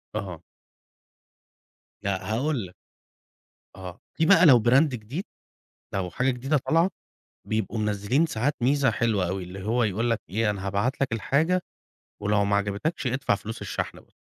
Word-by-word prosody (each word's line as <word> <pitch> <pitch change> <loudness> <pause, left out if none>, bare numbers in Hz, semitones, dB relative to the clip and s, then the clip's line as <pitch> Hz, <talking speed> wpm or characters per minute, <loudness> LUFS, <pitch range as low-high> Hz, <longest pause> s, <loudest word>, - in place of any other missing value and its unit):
آه. 90 -6 -5 1.6
لأ، 100 +1 -2
هاقول 130 -3 0
لك. 90 - -18 1.0
آه، 95 -1 -9 0.2
دي 160 - +4
بقى 185 -1 +7
لو 125 -7 +7
brand 130 +5 +6
جديد، 130 - -5 0.7
لو 90 -2 -1
حاجة 125 +8 +1
جديدة 135 +4 0
طالعة، 165 +4 +3 0.6
بيبقوا 110 0 -1
منزلين 105 +9 +1
ساعات 140 +2 -1
ميزة 140 +1 +3
حلوة 105 -7 0
أوي، 95 0 -3
اللي 95 +2 -8
هو 120 +2 +1
يقول 110 +4 0
لك 115 - 0
أنا 105 -2 -1
هابعت 105 +9 -1
لك 135 -4 0
الحاجة، 160 +10 +1 0.6
ولو 105 0 +2
معجبتكش 100 +9 -1
ادفع 125 -4 +1
فلوس 110 +2 -7
الشحن - - -4
بس. - - -27
115 Hz, 145 wpm, -26 LUFS, 100-135 Hz, 1.6 s, بقى